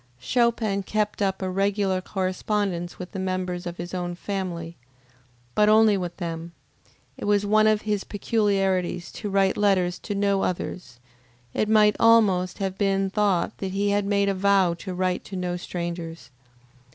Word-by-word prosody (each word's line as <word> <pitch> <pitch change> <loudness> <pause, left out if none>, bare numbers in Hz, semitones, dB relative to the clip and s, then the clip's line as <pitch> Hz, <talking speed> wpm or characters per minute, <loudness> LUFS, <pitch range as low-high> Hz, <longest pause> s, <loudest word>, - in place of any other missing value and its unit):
Chopin 225 - +1
kept 210 +1 -2
up 190 -1 0
a 185 - -1
regular 195 -1 0
correspondence 185 -1 -2
with 180 0 -8
the 195 - -5
members 185 -1 -3
of 175 0 -6
his 175 +1 -6
own 175 -1 -3
family, 175 -3 -4 0.8
but 210 0 +4
only 215 -1 +6
with 175 -2 -4
them. 170 -1 -5 0.6
It - - -6
was 205 0 +2
one 215 +1 +4
of 215 -1 +2
his 210 -2 -1
peculiarities 195 -4 0
to 210 - -5
write 195 -1 +2
letters 185 -3 +2
to 205 - -5
no 200 -1 +1
others; 175 -7 -4 0.5
it 215 - 0
might 210 -1 +5
almost 200 -6 +4
have 190 -1 -3
been 195 -1 +1
thought 200 -4 +1
that 190 -1 -4
he 200 +1 +1
had 205 0 +1
made 200 0 +2
a 200 - +2
vow 195 -2 +3
to 185 -2 -6
write 185 0 -1
to 195 - -8
no 180 -1 -2
strangers. 170 -4 -6
195 Hz, 165 wpm, -25 LUFS, 180-205 Hz, 0.8 s, only